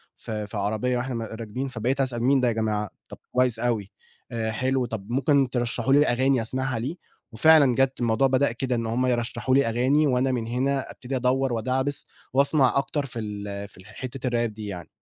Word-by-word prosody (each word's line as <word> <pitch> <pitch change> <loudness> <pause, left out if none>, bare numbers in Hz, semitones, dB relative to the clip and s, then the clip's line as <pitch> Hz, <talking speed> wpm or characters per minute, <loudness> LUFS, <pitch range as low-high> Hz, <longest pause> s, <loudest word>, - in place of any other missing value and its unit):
في 105 -1 -5
في 105 - -6
عربية 110 +5 0
وإحنا 120 -2 -3
راكبين 115 +4 -4
فبقيت 130 +2 -1
أسأل 120 -3 -1
مين 135 +2 +4
ده 125 - +2
يا 120 - +2
جماعة؟ 105 -2 -1 0.2
طَب - - -9
كويس 125 -3 +2
أوي، 115 -5 -1 0.4
آآ 110 -1 -2
حلو، 130 +3 0
طَب 110 -3 -6
ممكن 135 +1 +2
ترشحوا 120 +1 0
لي 145 +2 +5
أغاني 130 +1 +2
أسمعها 130 +1 -2
ليه؟ 135 +9 -3 0.4
وفعلا 140 +2 +5
جَات 135 +1 +1
الموضوع 120 +2 +2
بدأ 130 0 +2
كده 125 +1 -2
إن 115 -1 -2
هُم 120 +3 0
يرشحوا 125 +1 0
لي 140 - +4
أغاني 130 +6 +2
وأنا 130 0 +2
من 120 -3 -2
هنا 135 +3 -1
أبتدي 135 +1 -6
أدوّر 130 +1 +1
وادعبس 130 +5 -1 0.3
وأسمع 140 -1 +4
أكتر 140 +1 -1
في 125 -3 -5
ال 100 -1 -5
في 95 -1 -15
حتّة 130 +4 -5
الRap 120 -1 0
دي 105 0 -8
يعني. 90 -4 -7
125 Hz, 190 wpm, -25 LUFS, 115-135 Hz, 0.4 s, لي